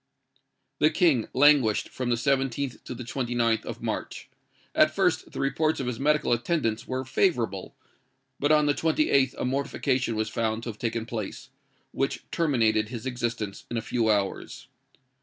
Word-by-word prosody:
"The 155 - +5
King 160 - +2
languished 135 -6 +4
from 125 -1 -4
the 120 - +3
17th 135 +1 -1
to 125 - -6
the 125 - -7
29th 120 -2 0
of - - -6
March. - - -4 0.4
At - - +5
first, - - +1
the - - -7
reports 155 +3 +1
of 135 - -2
his 125 -2 -3
medical 150 -2 +2
attendants 120 -2 -1
were 130 0 -3
favourable; 120 - 0 0.6
but 145 +2 +2
on 150 -1 +5
the 145 - +3
28th 145 -4 +2
a - - -2
mortification 130 -2 -1
was 110 0 -1
found 110 0 -2
to 120 - -4
have 110 - -8
taken 115 -1 -2
place, 110 -4 -6 0.4
which - - -2
terminated 115 -9 +2
his 120 0 -6
existence 120 -5 -3
in 120 - -3
a - - 0
few 115 -1 0
hours. 100 -2 -1
125 Hz, 160 wpm, -27 LUFS, 115-140 Hz, 0.6 s, The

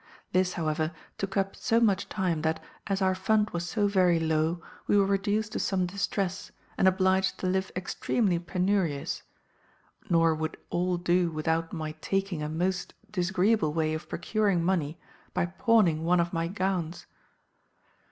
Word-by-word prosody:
"This, 185 0 +2
however, 155 0 -1 0.3
took 195 0 -3
up 195 0 0
so 230 -1 +2
much 205 -4 +2
time, 180 -6 -1
that, 160 0 0 0.3
as 195 -1 0
our 190 0 +3
fund 210 +3 +1
was 175 0 -3
so 205 0 +1
very 180 -4 +3
low, 160 +1 +1 0.3
we 205 - +4
were 200 - +5
reduced 205 +2 0
to - - -3
some 185 -2 +1
distress, 195 0 -2 0.2
and 190 - +3
obliged 190 0 +2
to - - -5
live 190 +1 0
extremely 185 +1 0
penurious; 180 -4 -1 0.9
nor 165 -1 +4
would 160 0 -3
all 180 0 +1
do 175 0 +2
without 160 +1 -1
my 155 -3 -4
taking 195 -4 -1
a 150 - -2
most 180 +3 -2 0.2
disagreeable 190 -2 +2
way 155 -1 +1
of 155 +1 -5
procuring 205 -6 +1
money 170 -4 0 0.4
by - - +2
pawning 185 -4 +2
one 175 +2 +3
of 170 +1 0
my 165 0 0
gowns. 185 -3 -2
180 Hz, 155 wpm, -28 LUFS, 165-195 Hz, 0.9 s, were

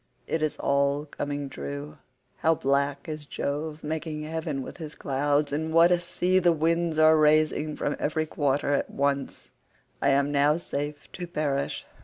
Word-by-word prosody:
It 160 - -1
is 155 -1 -1
all 140 +1 +1
coming 145 -1 -4
true. 145 +2 -7 0.4
How 160 +1 +3
black 140 0 0
is 155 -2 -6
Jove 150 +3 -3
making 155 0 -3
heaven 155 -3 -3
with - - -9
his 155 -3 -7
clouds, 145 +1 0
and 160 +2 -1
what 165 +2 +6
a 175 - +4
sea 180 +1 +1
the 175 -1 +4
winds 165 +1 +1
are 155 0 +7
raising 155 0 +3
from 145 - -1
every 155 +1 0
quarter 145 -2 0
at 140 - 0
once. 140 0 -2 0.5
I 140 - +3
am 140 +1 +3
now 145 +2 +3
safe 145 -3 -5
to 180 -2 -6
perish. 150 -5 -2
150 Hz, 165 wpm, -27 LUFS, 140-160 Hz, 0.5 s, are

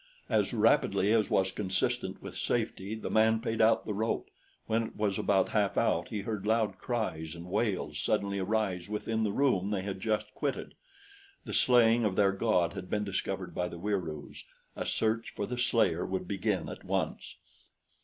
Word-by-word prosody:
As - - +2
rapidly 100 +3 +3
as 110 -3 +2
was 95 0 +2
consistent 95 -1 -2
with - - -7
safety, 100 +3 -2
the 110 - -5
man 110 +1 +4
paid 115 -1 -1
out 110 +1 +4
the 105 - -2
rope. 110 +3 -2 0.3
When 115 +1 +1
it 115 - -6
was 105 -2 0
about 95 -2 +2
half 105 -3 +1
out, - - +2
he 105 - -3
heard 105 -1 -4
loud 110 -4 +1
cries 90 -10 -3
and 85 0 -9
wails 95 -6 -1
suddenly 100 +2 0
arise 95 -2 -1
within 110 +1 -1
the 105 - +1
room 100 -6 +2
they 100 -3 -1
had 95 -1 -4
just 105 0 -1
quitted. 140 -3 -3 0.7
The - - -5
slaying 120 -2 +5
of 100 -4 +1
their 100 -1 +4
god 95 -3 +1
had 90 - -7
been 105 0 0
discovered 100 -2 -3
by 90 - -1
the 85 - -8
Wieroos. 85 -6 -4 0.3
A - - -4
search 115 +1 0
for 100 - -2
the 125 +3 -4
slayer 110 -9 +2
would 95 -1 -3
begin 95 -1 -1
at - - -8
once. - - -2
105 Hz, 180 wpm, -30 LUFS, 95-110 Hz, 0.7 s, slaying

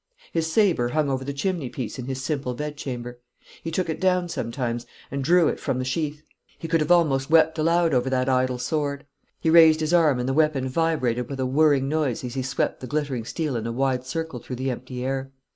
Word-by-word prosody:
His 165 -1 0
sabre 175 - +3
hung 150 -3 +1
over 130 0 -2
the 140 - -4
chimney 145 -1 -2
piece 120 -2 -5
in 125 - -5
his 130 0 -4
simple 135 -4 -2
bedchamber. 125 -4 -5 0.4
He 165 - -4
took 175 +2 -1
it 160 - -4
down 180 -1 +2
sometimes, 120 -4 -3 0.2
and 140 0 -2
drew 170 +2 +4
it - - -1
from 130 - -2
the 130 - -2
sheath. 150 +2 -2 0.3
He 165 - -6
could 165 0 +2
have 155 - -1
almost 150 -6 +3
wept 160 0 +4
aloud 165 0 +2
over 125 0 +2
that 130 0 0
idle 130 -1 +1
sword. 140 +2 -2 0.3
He 160 - +1
raised 160 -1 +7
his 155 +2 -1
arm, 160 -6 +4
and 125 0 -2
the 135 - 0
weapon 150 -3 +2
vibrated 130 -5 0
with 135 -1 -5
a 130 - 0
whirring 140 0 +3
noise 145 -5 -1
as 125 -1 -5
he 135 - -2
swept 130 +1 -1
the 130 - -7
glittering 140 -6 -2
steel 150 0 -2
in 115 -1 -2
a - - -2
wide 130 +1 0
circle 160 0 -4
through 125 - -7
the 130 +2 -2
empty 125 0 -6
air. 135 0 -3
140 Hz, 225 wpm, -24 LUFS, 130-160 Hz, 0.4 s, raised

